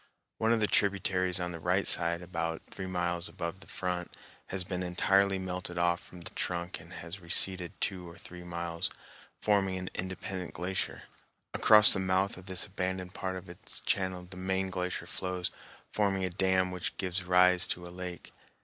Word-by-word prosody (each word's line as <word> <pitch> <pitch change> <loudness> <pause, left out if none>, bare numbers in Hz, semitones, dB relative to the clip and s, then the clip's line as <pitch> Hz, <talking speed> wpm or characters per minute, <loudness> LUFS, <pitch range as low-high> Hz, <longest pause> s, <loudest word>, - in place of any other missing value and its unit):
One 110 +1 +3
of 115 - +4
the 105 - +4
tributaries 95 -3 +2
on 90 0 -2
the 85 - -6
right 90 +4 +1
side, 85 0 +2
about 85 -2 -3
three 95 - -5
miles 90 0 -1
above 90 0 -5
the - - -15
front, 90 -1 -3 0.4
has 95 -1 -2
been 90 0 -3
entirely 95 +2 +3
melted 90 -1 -4
off 85 0 +2
from 90 - -12
the - - -8
trunk 85 0 -3
and 85 +1 -14
has 85 +1 -6
receded 90 +1 +2
two 90 -3 -2
or 85 - -13
three 90 +1 -10
miles, 85 -1 -2 0.5
forming 95 -3 +2
an 90 0 -5
independent 95 0 -5
glacier. 90 +1 -2 0.5
Across 105 -1 +9
the 95 - +3
mouth 95 +1 +1
of 90 +1 -12
this 95 -1 +2
abandoned 95 -1 -3
part 95 -1 -3
of 95 +1 -7
its 85 0 -8
channel 95 -2 0
the 90 0 -9
main 95 +1 -1
glacier 90 -1 -3
flows, 90 -1 -3 0.4
forming 95 -2 +1
a 90 - -2
dam 95 0 +2
which 90 -1 -4
gives 95 -1 -1
rise 90 0 +5
to 90 0 -3
a 85 - -10
lake. 90 -1 -7
90 Hz, 180 wpm, -31 LUFS, 90-95 Hz, 0.5 s, Across